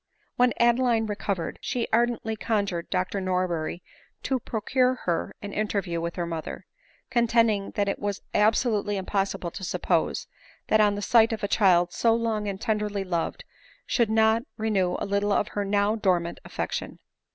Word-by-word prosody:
When 245 0 +3
Adeline 235 -1 +3
recovered, 205 -4 -3
she 240 -2 -2
ardently 230 -1 +1
conjured 200 -5 -1
Dr 185 +1 -1
Norberry 180 -3 -1 0.4
to 265 -1 0
procure 250 +3 +1
her 170 -2 -1
an 200 0 -6
interview 200 -5 -1
with 170 +1 -3
her 175 - -2
mother; 165 -2 -5 0.5
contending 230 -4 +2
that 205 -1 +1
it 200 - -1
was 205 -1 -3
absolutely 210 -1 +2
impossible 195 -2 -2
to 190 - -8
suppose, 175 - 0 0.4
that 215 - +4 0.2
the 205 - -4
sight 230 0 +5
of 220 - -5
a - - +1
child 175 -4 +3
so 230 -1 +3
long 225 -2 -1
and 195 -1 -3
tenderly 210 -2 -1
loved 180 - -2 0.4
should 235 -3 +1
not 220 +1 +4 0.2
renew 205 -5 +1
a - - -3
little 200 +1 0
of 205 - +1
her 205 - -2
now 205 +2 +1
dormant 180 -5 0
affection. - - -4
205 Hz, 155 wpm, -26 LUFS, 185-225 Hz, 0.5 s, sight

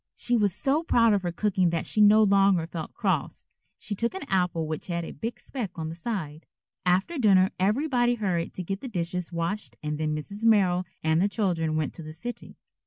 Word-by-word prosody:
She 245 - 0
was 205 -4 +3
so 275 - +1
proud 230 -9 +3
of 200 - +2
her 175 -1 -2
cooking 185 -1 +1
that 165 -2 -2
she 215 - +1
no 210 +1 +7
longer 195 -4 +4
felt 165 -1 -6
cross. - - -2 0.3
She 220 - -6
took 235 - -1
an 340 -7 -6
apple 180 -4 +1
which 155 0 -5
had 170 -2 -2
a - - -7
big 230 +1 -5
speck 220 -11 -6
on 160 -1 -3
the 165 - -6
side. 165 -6 -5 0.4
After 195 - +1
dinner 190 -5 +5
everybody 240 +4 +2
hurried 185 -7 -2
to 185 - -4
get 195 +3 -4
the 265 - -6
dishes 180 -4 -3
washed 170 - -3
and 150 0 -3
then 155 -1 0
Mrs. 200 +8 -7
Merrill 190 -5 +4 0.2
and 160 +1 +2
the 200 - +2
children 170 -7 0
went 155 -2 -1
to - - -10
the 155 -1 -8
city. 240 +8 -8
190 Hz, 210 wpm, -27 LUFS, 165-215 Hz, 0.4 s, no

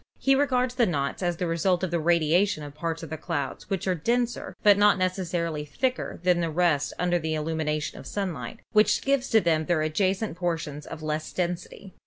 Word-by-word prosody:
He 270 - +3
regards 255 -3 +2
the 250 -2 +2
knots 140 -3 -2
as 175 -2 0
the 180 - -1
result 175 +2 +1
of 185 - -1
the 170 - +1
radiation 170 +2 +2
of 145 -1 -8
parts 165 +2 -4
of 160 - -8
the 160 - -3
clouds 145 -3 -4
which 195 -3 -2
are 185 - +2
denser, 235 +8 -1
but 205 -1 +7
not 205 0 +5
necessarily 175 -4 -1
thicker 255 - -2
than 180 -1 +3
the 165 - 0
rest 155 -3 +1
under 175 0 +1
the 160 -1 -2
illumination 155 -1 -2
of - - -10
sunlight, 175 - -4
which 215 0 +3
gives 275 -1 +1
to 225 - +5
them 160 -3 +1
their 170 -3 +2
adja 185 +5 +1
cent 195 -4 -5
portions 160 -5 -3
of 155 - -8
less 155 0 -3
density. 180 +1 -4
175 Hz, 205 wpm, -26 LUFS, 155-195 Hz, -, but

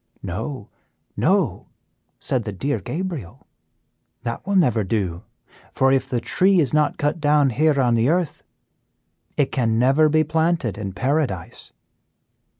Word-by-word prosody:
"'No, 105 - -5 0.4
no,' - - +1 0.5
said 125 -3 -1
the 105 - -4
dear 135 +9 -2
Gabriel, 155 - -6 0.8
'that 115 +8 -5
will 200 - 0
never 125 - +3
do, 95 -4 -2 0.5
for 135 0 +2
if 135 -1 +1
the 125 - 0
tree 190 +9 +2
is 140 -7 +1
not 150 -1 +2
cut 145 +3 -1
down 145 -2 +3
here 150 +3 +2
on 125 -3 +3
the 115 +3 +2
earth, 175 -1 0 1.0
it 140 -2 +1
can 115 -3 +1
never 135 +6 +4
be 155 +1 +3
planted 160 - 0
in 100 -3 -5
paradise. 130 - -2
135 Hz, 140 wpm, -22 LUFS, 115-155 Hz, 1.0 s, never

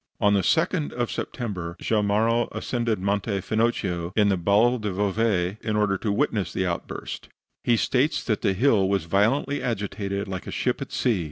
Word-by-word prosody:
On 105 0 +4
the 100 - +3
second 160 - +1
of 120 -1 -2
September, 90 -8 -4
Gemellaro 110 +2 +1
ascended 115 -3 -1
Monte 100 +1 -1
Finocchio 95 -6 -1
in 105 -2 +4
the 95 - +3
Val 105 +7 +3
del 105 -4 -3
Bove 100 -2 0
in 110 -1 -2
order 105 -2 +2
to 105 - -1
witness 105 -4 0
the 95 - -1
outburst. 85 -1 -5 0.3
He 120 -1 +3
states 135 +7 +1
that 110 -3 -1
the 95 - +2
hill 100 -3 +3
was 100 -4 +1
violently 115 +11 +1
agitated, 100 -3 -3
like 95 -1 -5
a - - -5
ship - - -1
at - - -6
sea. 115 -6 +1
105 Hz, 175 wpm, -25 LUFS, 95-115 Hz, 0.3 s, On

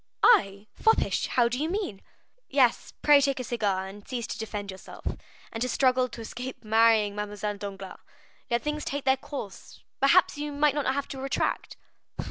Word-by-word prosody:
"I 200 - +4
foppish? 445 - +2
how 240 -2 +3
do 245 +2 -2
you 315 - 0
mean?" 360 - -3 0.5
"Yes; 265 -4 +2
pray 290 -1 +7
take 275 -1 +1
a - - -2
cigar, 205 -6 -1
and 200 +1 -11
cease 245 -3 -3
to - - -6
defend 210 -2 -5
yourself, 190 - -12 0.5
and 225 - -6
to 250 - 0
struggle 255 0 +2
to 235 - -9
escape 250 +3 -7
marrying 220 -1 +4
Mademoiselle 210 0 -4
Danglars. 195 -1 -7 0.5
Let 235 0 0
things 300 0 -2
take 285 0 -3
their 265 0 +4
course; 275 -8 -8 0.2
perhaps 290 +2 +4
you 295 0 -3
may 290 +1 +3
not 280 -2 0
have 280 +1 -2
to 265 - -6
retract." 270 0 -2
245 Hz, 175 wpm, -27 LUFS, 210-280 Hz, 0.5 s, pray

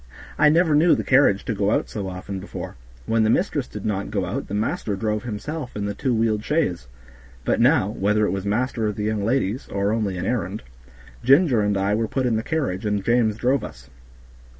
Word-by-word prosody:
I 150 0 +6
never 165 0 +3
knew 160 +3 +5
the - - -2
carriage 130 -7 +3
to - - -1
go 100 -1 0
out - - +1
so 100 -3 -5
often 95 +1 -6
before; 95 - -7 0.3
when 115 0 +1
the 110 - +3
mistress 145 - +1
did 105 - -8
not 100 -2 -2
go 100 -3 -1
out - - -4
the 100 - -4
master 105 -1 -1
drove 105 +2 -2
himself 125 +5 -5
in 105 -1 -3
the 100 - -2
two 130 +5 -2
wheeled 110 -2 +1
chaise; 90 - -1 0.6
but - - +1
now, 95 - +4
whether 105 +1 +1
it - - 0
was 95 -1 -3
master 115 +2 -1
or 105 - -1
the 105 - -4
young 105 -1 -1
ladies, 115 0 0
or 100 +1 -1
only 105 -4 -1
an 90 - -3
errand, 105 -4 -2 0.6
Ginger 135 -2 +5
and 105 -1 +1
I 100 +1 +1
were 110 +1 0
put 130 +3 -1
in 120 -2 +1
the 110 - 0
carriage 130 -10 -2
and 105 -2 -1
James 115 -3 +2
drove 130 +3 +1
us. 60 +2 -10
110 Hz, 220 wpm, -23 LUFS, 100-125 Hz, 0.6 s, I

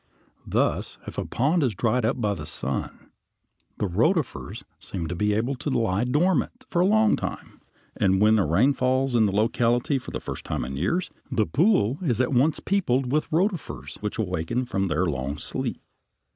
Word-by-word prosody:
Thus - - 0
if - - -5
a - - -2
pond 150 +8 +1
is 125 -7 +1
dried 120 +3 +1
up 120 +3 0
by 105 -3 +1
the 75 -6 -7
sun, 70 -3 -5 0.7
the - - -1
rotifers 135 - 0 0.2
seem 85 -4 -5
to 85 +2 -4
be 105 +3 +1
able 120 +6 0
to 145 - -3
lie 115 -4 +1
dormant 180 - +1
for 175 - -1
a 185 - +4
long 220 +1 +4
time, - - -6 0.3
and 95 -1 +2
when 110 +1 +5
a 95 - +2
rain 110 - +4
falls 130 0 +1
in 110 -3 +4
the - - 0
locality 120 - +1
for - - -10
the - - -4
first - - -6
time - - -3
in 65 +1 -5
years, 100 - -1 0.2
the 110 - +2
pool 145 - +2
is 125 - 0
at 130 +2 +1
once 140 +5 +3
peopled 135 -10 0
with 150 +2 0
rotifers 160 - -1
which 105 +1 -3
awaken 105 +4 -1
from 95 -5 -1
their 85 +2 +1
long 70 -2 -2
sleep. - - -4
120 Hz, 185 wpm, -25 LUFS, 95-145 Hz, 0.7 s, when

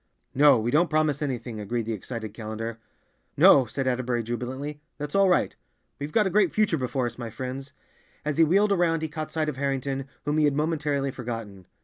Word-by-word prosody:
"No, 145 0 +6
we 115 +2 -1
don't 170 +5 +3
promise 155 -2 +1
anything," 120 -5 -3
agreed 115 +3 -2
the 115 - -2
excited 110 0 -6
Callender. 110 +1 -5 0.6
"No," 130 -3 +7
said 135 +5 -3
Atterbury 125 -2 0
jubilantly, 130 +6 -5 0.2
"that's 150 0 -5
all 195 -1 +4
right. 180 - +2 0.4
We've 145 +1 -4
got 215 +2 +3
a 190 - 0
great 195 -2 +3
future 205 -7 +2
before 130 0 -1
us, 120 +1 -5
my 120 -2 -4
friends." 130 +4 -6 0.5
As 150 0 -1
he - - +8
wheeled 200 +6 +3
around 170 -4 +2
he - - 0
caught 155 0 -6
sight 155 -1 -1
of 150 -4 -3
Harrington, 135 -1 -2 0.2
whom 150 +2 +1
he 155 - +4
had 145 -1 +2
momentarily 150 -3 0
forgotten. 115 -7 -7
135 Hz, 200 wpm, -26 LUFS, 120-155 Hz, 0.6 s, he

